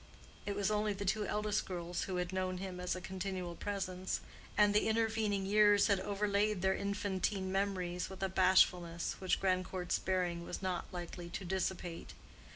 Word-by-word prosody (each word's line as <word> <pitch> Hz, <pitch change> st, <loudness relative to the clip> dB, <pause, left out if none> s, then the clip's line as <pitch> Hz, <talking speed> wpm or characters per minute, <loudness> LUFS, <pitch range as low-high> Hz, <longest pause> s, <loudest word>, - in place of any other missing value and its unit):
It 200 Hz, -, -1 dB
was 205 Hz, +1 st, +1 dB
only 210 Hz, 0 st, +1 dB
the 200 Hz, 0 st, -5 dB
two 210 Hz, +2 st, +1 dB
eldest 210 Hz, 0 st, 0 dB
girls 175 Hz, -1 st, -3 dB
who 190 Hz, -, -3 dB
had 180 Hz, +1 st, -2 dB
known 185 Hz, -1 st, -1 dB
him 185 Hz, -1 st, -5 dB
as 180 Hz, 0 st, -1 dB
a 185 Hz, -, -6 dB
continual 185 Hz, -1 st, -4 dB
presence; 190 Hz, -2 st, -2 dB, 0.4 s
and 205 Hz, -1 st, +5 dB
the 210 Hz, -, +3 dB
intervening 220 Hz, -3 st, +1 dB
years 205 Hz, 0 st, +5 dB
had 200 Hz, -3 st, +3 dB
overlaid 205 Hz, 0 st, 0 dB
their 190 Hz, 0 st, +4 dB
infantine 200 Hz, -1 st, -1 dB
memories 185 Hz, -3 st, -1 dB
with 190 Hz, 0 st, -6 dB
a -, -, +3 dB
bashfulness 180 Hz, -2 st, +3 dB
which 185 Hz, -1 st, +1 dB
Grandcourt's 185 Hz, -1 st, 0 dB
bearing 180 Hz, -2 st, 0 dB
was 175 Hz, -, -5 dB
not 185 Hz, -2 st, -3 dB
likely 175 Hz, -1 st, -6 dB
to 190 Hz, -, -5 dB
dissipate. 180 Hz, -2 st, -3 dB
190 Hz, 165 wpm, -35 LUFS, 180-205 Hz, 0.4 s, and